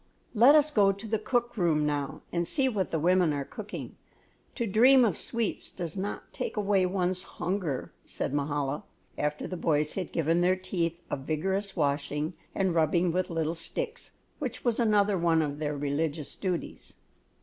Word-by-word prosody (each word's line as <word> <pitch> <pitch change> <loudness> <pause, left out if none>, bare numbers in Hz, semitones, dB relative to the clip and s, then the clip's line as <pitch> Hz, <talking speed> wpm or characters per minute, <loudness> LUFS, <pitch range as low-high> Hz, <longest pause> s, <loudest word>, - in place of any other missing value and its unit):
"Let 245 +6 +7
us 300 0 +5
go 200 -6 +5
to 200 +3 -8
the 220 0 0
cook 240 +2 0
room 165 -7 +2
now 145 -2 -2
and 170 -1 0
see 270 -3 +2
what 205 -7 -1
the 165 - -1
women 175 +1 +3
are 140 -1 -2
cooking; 215 - -8 0.6
to 235 - -1
dream 245 +5 +6
of 200 -7 +1
sweets 230 -3 -2
does 170 -2 -5
not 200 +1 -5
take - - -4
away 200 -3 +2
one's 185 -1 0
hunger," 175 -10 -3
said - - -3
Mahala, 145 0 -1 0.3
after 150 0 -2
the 185 - -5
boys 150 -3 +1
had 185 -4 -4
given 165 +1 +1
their 180 +1 +4
teeth 170 -3 -2
a - - +2
vigorous 190 +8 -2
washing 150 0 -1 0.2
and 190 -3 +1
rubbing 170 +2 +2
with 185 +2 -1
little 165 -1 -1
sticks, 470 - -5 0.3
which - - -4
was 240 -1 +1
another 205 -4 +3
one 165 -1 +3
of 145 -1 -4
their 150 -1 -2
religious 145 +1 -2
duties. 180 -3 -4
180 Hz, 170 wpm, -29 LUFS, 155-205 Hz, 0.6 s, Let